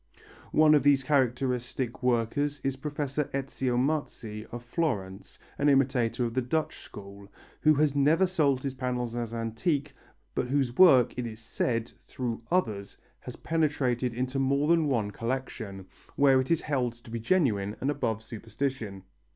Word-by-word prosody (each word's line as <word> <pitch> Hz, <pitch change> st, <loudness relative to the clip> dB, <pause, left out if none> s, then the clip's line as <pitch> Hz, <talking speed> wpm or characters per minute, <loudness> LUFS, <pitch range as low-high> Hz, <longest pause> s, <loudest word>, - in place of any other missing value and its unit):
One 155 Hz, 0 st, +5 dB
of 150 Hz, -, +5 dB
these 140 Hz, 0 st, +4 dB
characteristic 125 Hz, -2 st, 0 dB
workers 125 Hz, +4 st, 0 dB
is 135 Hz, -1 st, 0 dB
Professor 145 Hz, +1 st, -2 dB
Ezio 135 Hz, -2 st, -1 dB
Marzi 125 Hz, -6 st, -2 dB
of 120 Hz, 0 st, -7 dB
Florence, 105 Hz, -, -3 dB, 0.2 s
an 145 Hz, -, +4 dB
imitator 130 Hz, -3 st, +2 dB
of 115 Hz, -, -3 dB
the 130 Hz, -, +1 dB
Dutch 155 Hz, +6 st, -2 dB
school, 100 Hz, 0 st, -11 dB, 0.3 s
who 155 Hz, 0 st, +4 dB
has 145 Hz, -1 st, +2 dB
never 155 Hz, +6 st, +4 dB
sold 145 Hz, -8 st, +1 dB
his 135 Hz, -2 st, -2 dB
panels 125 Hz, -2 st, -3 dB
as 120 Hz, -2 st, -3 dB
antique, 115 Hz, +6 st, -2 dB, 0.4 s
but -, -, -1 dB
whose 130 Hz, -2 st, 0 dB
work, 135 Hz, -9 st, +6 dB
it 120 Hz, -, -2 dB
is 110 Hz, -1 st, -8 dB
said, 115 Hz, 0 st, -2 dB, 0.2 s
through 120 Hz, -3 st, -4 dB
others, 110 Hz, -, -1 dB, 0.2 s
has -, -, -9 dB
penetrated 140 Hz, -6 st, 0 dB
into 130 Hz, +2 st, -2 dB
more 140 Hz, +2 st, +1 dB
than 165 Hz, -2 st, +4 dB
one 115 Hz, -7 st, 0 dB
collection, 115 Hz, -5 st, -4 dB, 0.3 s
where 135 Hz, -2 st, +5 dB
it 130 Hz, -, -6 dB
is 165 Hz, -2 st, +2 dB
held 130 Hz, -5 st, 0 dB
to 120 Hz, -1 st, -15 dB
be 115 Hz, -, -3 dB
genuine 110 Hz, -, +1 dB
and 135 Hz, -, 0 dB
above 110 Hz, -6 st, -2 dB
suspicion. 110 Hz, -2 st, -4 dB
130 Hz, 155 wpm, -28 LUFS, 115-145 Hz, 0.4 s, work